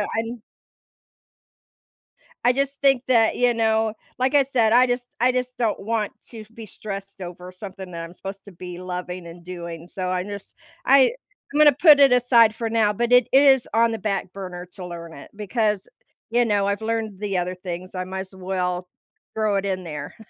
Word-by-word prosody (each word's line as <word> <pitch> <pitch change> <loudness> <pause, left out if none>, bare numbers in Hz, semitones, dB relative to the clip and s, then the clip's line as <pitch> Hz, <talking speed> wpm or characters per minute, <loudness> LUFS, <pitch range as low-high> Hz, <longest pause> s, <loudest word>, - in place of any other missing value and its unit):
and 225 0 -3 2.0
I 245 - +5
just 275 +1 -1
think 270 -2 +4
that 230 -3 +4
you 245 -1 +3
know, 220 -1 +1 0.3
like 260 +3 +1
I 280 - +6
said, 240 -5 +1
I 250 +1 +6
just 245 0 -3
I 250 +1 +4
just 250 0 -3
don't 225 -4 0
want 215 0 -2 0.2
to 220 -3 -10
be 225 -2 -9
stressed 195 -1 -8
over 180 +1 -8
something 190 -1 -9
that 165 0 -6
I'm 165 +1 -9
supposed 195 +2 -9
to 200 - -11
be 180 0 -9
loving 180 -1 -6
and 170 +1 -12
doing, 170 -2 -8
so 185 0 -4
I 180 0 -1
just 200 0 -9 0.3
I 270 - +6 0.4
I'm - - -1
gonna 295 -2 +7
put 295 0 +7
it 275 -2 +7
aside 235 -3 +5
for 230 -1 -3
now, 220 -2 +2
but 240 +3 -1
it 250 -1 +6
is 270 -2 +5
on 230 0 +3
the 225 - -2
back 195 -2 -2
burner 180 -2 -7
to 180 - -8
learn 170 -2 -8
it 140 - -12
because, 210 -1 -1 0.4
you 240 +1 +2
know, 205 -2 +1
I've 200 +2 -1
learned 220 -3 -3
the 200 -3 -2
other 180 +1 -2
things, 180 0 -7
I 185 - -2
might 190 +1 -5
as 190 0 -11
well 180 -1 -3 0.5
throw 215 -2 +1
it 195 0 0
in 185 -1 -2
there. 155 -4 -7
210 Hz, 195 wpm, -23 LUFS, 185-240 Hz, 2.0 s, gonna